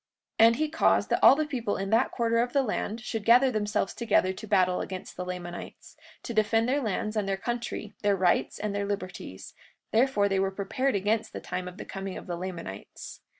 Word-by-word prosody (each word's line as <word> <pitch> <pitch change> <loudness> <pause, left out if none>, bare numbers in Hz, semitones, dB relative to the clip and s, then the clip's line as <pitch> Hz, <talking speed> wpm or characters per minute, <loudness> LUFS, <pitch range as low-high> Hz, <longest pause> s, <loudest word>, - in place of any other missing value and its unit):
43:26 225 - +9
And 230 - +3
he 310 +4 0
caused 320 +2 +2
that - - +3
all - - +9
the 310 +1 0
people 240 -8 -2
in 195 +1 -3
that 230 +3 +3
quarter 230 -1 0
of 245 +1 0
the 275 - +3
land 225 -1 -3
should 220 -1 -4
gather 245 +4 +6
themselves 210 -2 -1
together 205 -5 +1
to 215 - -9
battle 185 -2 +2
against 185 -1 -7
the 180 - -4
Lamanites, 180 -1 -7 0.3
to 235 - -5
defend 225 +1 +2
their 280 +3 +1
lands 215 -1 -2
and 205 -2 -1
their 195 - 0
country, 235 -2 -4
their 205 -1 +3
rights 180 -2 +1
and 210 -1 -3
their 200 0 -2
liberties; 185 - -6 0.4
therefore 225 -3 +3
they 195 -1 +1
were 195 0 +1
prepared 210 +7 -1
against 215 +3 0
the - - -5
time 180 0 -5
of 180 - -9
the - - -7
coming 195 -1 -6
of - - -9
the 175 - -4
Lamanites. 170 - -7
210 Hz, 215 wpm, -28 LUFS, 190-230 Hz, 0.4 s, 43:26